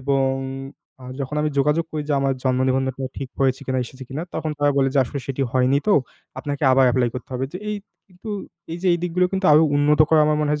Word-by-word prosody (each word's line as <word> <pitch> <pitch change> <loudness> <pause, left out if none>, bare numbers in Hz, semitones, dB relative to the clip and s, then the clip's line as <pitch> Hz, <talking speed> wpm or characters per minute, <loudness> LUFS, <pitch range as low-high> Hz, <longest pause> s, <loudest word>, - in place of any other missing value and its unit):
এবং 135 0 +1 0.8
আ - - -10 0.2
যখন 140 +2 -3
আমি 155 - 0
যোগাযোগ 150 +4 +2
করি 155 -1 -3
যে, - - +1
আমার 135 0 +1
জন্ম 130 -1 +1
নিবন্ধনটা 130 0 -1 0.2
ঠিক 135 -2 -5
হয়েছে 135 0 +2
কিনা, 130 -1 0
এসেছে 130 +2 -10
কিনা, 140 +4 -4
তখন 155 - -2
তারা 145 0 +3
বলে 135 -1 +3
যে, 140 - +3
আসলে 140 +3 -5
সেটি 135 0 -2
হয়নি। 130 +1 +3
তো 205 - +5 0.5
আপনাকে 145 0 -4
আবার 130 0 +5
এপ্লাই 125 -2 +2
করতে 125 - -7
হবে। 130 - -1
যে, 180 - -5
এই 210 - -2 0.3
কিন্তু 185 +4 -12 0.4
এই 170 - -4
যে, 190 - +2
দিকগুলো, 180 +1 +1
কিন্তু 190 -1 0
আরো 155 +2 +7
উন্নত 150 +1 +3
করা 160 -1 +5
আমার 150 0 +2
মনে 150 - 0
হয় 150 0 0
140 Hz, 230 wpm, -22 LUFS, 130-155 Hz, 0.8 s, আরো